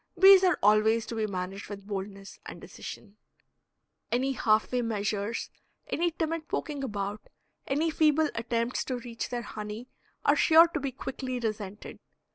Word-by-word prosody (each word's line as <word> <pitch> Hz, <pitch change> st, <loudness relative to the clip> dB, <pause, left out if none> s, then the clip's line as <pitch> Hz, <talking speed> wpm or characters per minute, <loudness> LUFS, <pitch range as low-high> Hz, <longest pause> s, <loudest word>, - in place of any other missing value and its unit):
Bees 385 Hz, 0 st, +9 dB
are 365 Hz, -1 st, +4 dB
always 215 Hz, +2 st, +4 dB
to -, -, -6 dB
be 220 Hz, -1 st, 0 dB
managed 190 Hz, +1 st, -5 dB
with 200 Hz, -1 st, -8 dB
boldness 195 Hz, -1 st, -6 dB
and -, -, -8 dB
decision. 210 Hz, -1 st, -10 dB, 0.9 s
Any 260 Hz, +3 st, +1 dB
half 220 Hz, -4 st, +2 dB
way 250 Hz, -1 st, +1 dB
measures, 210 Hz, -1 st, -2 dB, 0.3 s
any 345 Hz, +2 st, 0 dB
timid 325 Hz, -1 st, -3 dB
poking 290 Hz, -3 st, -3 dB
about, 205 Hz, -3 st, -4 dB, 0.4 s
any 310 Hz, +4 st, +1 dB
feeble 310 Hz, 0 st, +3 dB
attempts 235 Hz, +1 st, -1 dB
to 255 Hz, -, -2 dB
reach 235 Hz, -1 st, -6 dB
their 240 Hz, -1 st, -3 dB
honey, 215 Hz, +3 st, -7 dB, 0.4 s
are -, -, +5 dB
sure 330 Hz, +1 st, +7 dB
to 325 Hz, -, -3 dB
be 275 Hz, -1 st, -3 dB
quickly 255 Hz, 0 st, -5 dB
resented. 210 Hz, -3 st, -5 dB
230 Hz, 150 wpm, -29 LUFS, 210-280 Hz, 0.9 s, Bees